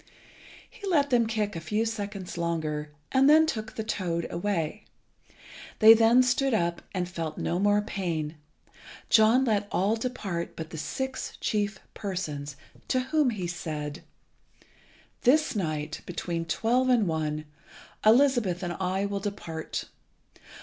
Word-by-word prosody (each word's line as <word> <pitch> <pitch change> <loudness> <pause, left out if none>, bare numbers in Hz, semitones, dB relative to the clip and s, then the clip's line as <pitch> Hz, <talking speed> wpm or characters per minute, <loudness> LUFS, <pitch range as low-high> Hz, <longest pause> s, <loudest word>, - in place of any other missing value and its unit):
He 430 -5 -9
let 290 -6 +2
them 235 -2 +4
kick 215 -3 -1
a - - -3
few 210 +7 0
seconds 205 -4 -5
longer, 160 -3 -2 0.2
and 270 +1 +5
then 315 +1 +7
took 220 -8 -4
the 220 - -3
toad 175 -6 -2
away. 175 +1 -2 0.9
They 220 +1 +10
then 230 +3 +5
stood 265 0 +2
up 170 -3 0
and 180 -2 -2
felt 165 -3 -5
no 175 - -1
more 205 +1 +3
pain. 165 -7 -3 0.7
John 230 +4 +6
let 210 -3 +1
all 200 +4 +2
depart 210 -8 -4
but 160 0 -7
the 160 - -6
six 265 - -4
chief 205 -1 -1 0.2
persons, 150 -8 -4 0.3
to 255 - +1
whom 305 -4 +4
he 205 -6 -3
said 155 -3 -5 1.2
"This 275 +1 +3
night, 155 -5 -3
between 170 -1 -3
twelve 240 +9 +1
and 240 -4 +4
one, 155 -1 -2 0.6
Elizabeth 225 -6 +4
and 175 -1 -2
I 190 +1 0
will 200 0 -2
depart. 170 -6 -5
200 Hz, 135 wpm, -27 LUFS, 170-230 Hz, 1.2 s, They